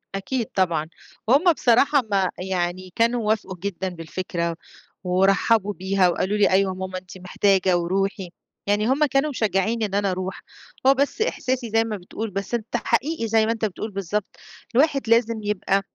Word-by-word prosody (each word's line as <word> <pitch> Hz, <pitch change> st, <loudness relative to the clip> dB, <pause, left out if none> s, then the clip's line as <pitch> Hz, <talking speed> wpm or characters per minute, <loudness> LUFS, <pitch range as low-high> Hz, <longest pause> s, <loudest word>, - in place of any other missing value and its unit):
أكيد 230 Hz, +5 st, -2 dB
طبعًا، 170 Hz, -5 st, +1 dB, 0.4 s
هُم 300 Hz, +8 st, +5 dB
بصراحة 270 Hz, +3 st, +3 dB
ما 190 Hz, -2 st, +2 dB
يعني 185 Hz, 0 st, -3 dB
كانوا 230 Hz, -1 st, +1 dB
وافقوا 210 Hz, -3 st, -1 dB
جدًا 190 Hz, 0 st, -3 dB
بالفكرة، 170 Hz, 0 st, -4 dB, 0.5 s
ورحبوا 195 Hz, +3 st, +2 dB
بيها، 190 Hz, 0 st, +2 dB
وقالوا 190 Hz, +4 st, -1 dB
لي 205 Hz, -, +4 dB
أيوه 190 Hz, 0 st, +3 dB
يا -, -, -6 dB
ماما 185 Hz, 0 st, -4 dB
أنتِ 185 Hz, 0 st, -10 dB
محتاجة، 185 Hz, 0 st, +2 dB
ورُوحي، 190 Hz, +2 st, -1 dB, 0.4 s
يعني 205 Hz, +2 st, +2 dB
هُم 280 Hz, +4 st, +3 dB
كانوا 275 Hz, +1 st, +1 dB
مشجعينني 220 Hz, -2 st, 0 dB
إن 200 Hz, -1 st, -4 dB
أنا 200 Hz, -1 st, +1 dB
أرُوح، 185 Hz, +1 st, -4 dB, 0.5 s
هو 270 Hz, -, +8 dB
بس 280 Hz, -, -1 dB
إحساسي 260 Hz, -, -1 dB
زَي 225 Hz, +1 st, +3 dB
ما 220 Hz, -2 st, -4 dB
بتقول، 210 Hz, +4 st, -6 dB
بس 195 Hz, +3 st, -5 dB
أنت 230 Hz, -2 st, -1 dB
حقيقي 270 Hz, +1 st, -1 dB
زَي 220 Hz, 0 st, +3 dB
ما 225 Hz, -, +1 dB
أنت 225 Hz, -1 st, -1 dB
بتقول 215 Hz, +2 st, -5 dB
بالضبط، 195 Hz, +1 st, -3 dB, 0.4 s
الواحد 275 Hz, -3 st, +2 dB
لازم 230 Hz, -1 st, +3 dB
يبقى 200 Hz, -1 st, 0 dB
200 Hz, 165 wpm, -23 LUFS, 185-230 Hz, 0.5 s, هو